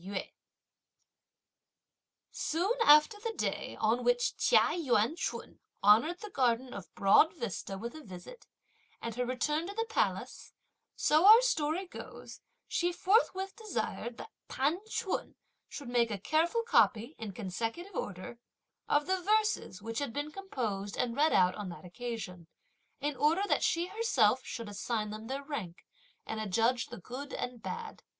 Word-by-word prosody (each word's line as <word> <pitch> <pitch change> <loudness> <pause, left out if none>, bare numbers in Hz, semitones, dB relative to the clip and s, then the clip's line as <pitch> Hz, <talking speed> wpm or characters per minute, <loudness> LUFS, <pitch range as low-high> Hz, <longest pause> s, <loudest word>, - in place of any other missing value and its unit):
Soon 350 +8 0
after 300 +7 +6
the 455 +1 -3
day - - -3
on 225 +3 +1
which 245 0 +2
Chia - - +4
Yuan 275 -5 +1
ch'un 350 - -5 0.2
honoured 235 - +5
the 425 -2 -8
garden 250 -2 +1
of 195 - -9
Broad 200 - +5
Vista 195 - -4
with 235 +4 -6
a 315 - -9
visit, 210 - -11 0.5
and 230 - -5
her 245 +2 -2
return 300 +6 -1
to 400 - -7
the 455 +1 0
Palace, 450 - -2 0.4
so 310 +5 +4
our 440 +2 +11
story 320 -5 0
goes, 360 - -10 0.3
she 350 +1 0
forthwith 385 +1 +1
desired 340 - -4
that - - -9 0.2
T'an 290 +7 0
ch'un 445 -4 -3 0.3
should 285 - -8
make 240 -1 +2
a 210 - -2
careful 325 - +1
copy, 250 - +3
in 220 -3 -5
consecutive 225 - -4
order, 200 - -5 0.5
of 290 0 +3
the 375 0 0
verses, 425 - +1
which 225 +1 -3
had 285 -4 -3
been 290 +4 -4
composed 225 - -4
and 235 -2 -1
read 305 +3 +3
out 180 -1 +4
on 205 -1 -6
that 175 - -10
occasion, 180 -4 -6 0.5
in 290 0 -1
order 315 +8 +2
that - - +2
she 335 +1 +1
herself 360 - +2
should 230 -2 -6
assign 210 +1 -3
them 215 +1 -7
their 270 +2 -4
rank, 225 - -6 0.4
and 220 - -4
adjudge 230 +4 +1
the - - -9
good 260 +9 -8
and 245 -2 -5
bad. 460 - -6
260 Hz, 150 wpm, -31 LUFS, 220-350 Hz, 0.5 s, our